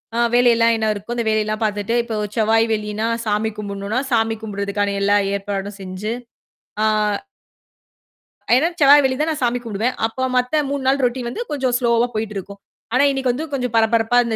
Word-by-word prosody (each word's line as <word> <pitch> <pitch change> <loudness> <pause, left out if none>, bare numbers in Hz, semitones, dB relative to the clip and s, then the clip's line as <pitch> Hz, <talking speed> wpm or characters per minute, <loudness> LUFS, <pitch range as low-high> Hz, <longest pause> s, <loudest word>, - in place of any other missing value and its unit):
அ - - -1 0.2
வேலையெல்லாம் 235 -1 +4
என்ன 220 -1 0
இருக்கோ, 210 +4 -6
அந்த 235 -1 -2
வேலையெல்லாம் 215 +1 0
பார்த்துட்டு, 210 +2 -1
இப்போ 230 -2 -5 0.2
செவ்வாய், 225 +1 +3
வெள்ளின்னா 210 +1 -2 0.2
சாமி 215 +1 0
கும்பிடணும்னா, 200 +3 -3
சாமி 225 -1 +1
கும்புடறதுக்கான 200 -1 -2
எல்லா 205 +1 +3 0.2
ஏற்பாடும் 200 0 -4
செஞ்சு, 190 +4 -4 0.7
ஆ - - +4 1.7
ஏன்னா 305 +6 +3
செவ்வாய், 285 0 +7
வெள்ளி 260 -1 +1
தான் 320 - +1
நான் 300 - -4
சாமி 245 +1 +1
கூப்பிடுவேன். 225 +3 -2
அப்போ 260 +3 -3
மத்த 250 +5 +1
3 280 -2 -2
நாள் 270 +1 +2
ரொட்டின் 245 0 -2
வந்து 465 - -5
கொஞ்சம் 260 -4 0
ஸ்லோவா 235 0 +2
போயிட்டுருக்கும். 200 -2 -5 0.3
ஆனா 260 +3 +4
இன்னைக்கு 265 -2 0
வந்து 300 +6 -4
கொஞ்சம் 250 -3 -2
பரபரப்பா 225 +1 +3
இந்த 225 -1 -1
225 Hz, 165 wpm, -20 LUFS, 210-250 Hz, 1.7 s, செவ்வாய்